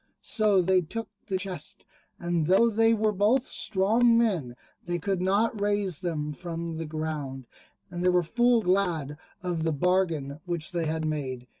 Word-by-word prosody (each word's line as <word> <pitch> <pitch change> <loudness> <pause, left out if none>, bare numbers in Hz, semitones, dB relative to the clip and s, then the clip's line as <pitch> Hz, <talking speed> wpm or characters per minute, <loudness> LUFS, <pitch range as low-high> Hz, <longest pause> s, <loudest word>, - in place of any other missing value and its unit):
So 210 -5 +3
they 185 +1 +3
took 225 +7 -6 0.2
the 190 -3 0
chests, 185 -1 -5 0.3
and 170 -3 -1
though 230 +6 +4
they 225 +1 +4
were 215 -1 +2
both 215 +6 +2
strong 220 +4 +2
men 180 - 0 0.3
they 175 0 -2
could 190 +1 -2
not 205 +3 +1
raise 205 -5 0
them 150 -4 -3
from 170 0 -5
the 165 -1 -4
ground; 150 -4 -4 0.5
and 175 0 -4
they 180 - +4
were 180 -1 +3
full 240 +6 +2
glad 175 -6 0 0.3
of 175 -3 -2
the 160 0 +1
bargain 160 -3 0
which 170 -3 -2
they 170 -2 -1
had 160 0 -2
made. 135 -5 -3
180 Hz, 165 wpm, -27 LUFS, 160-205 Hz, 0.5 s, though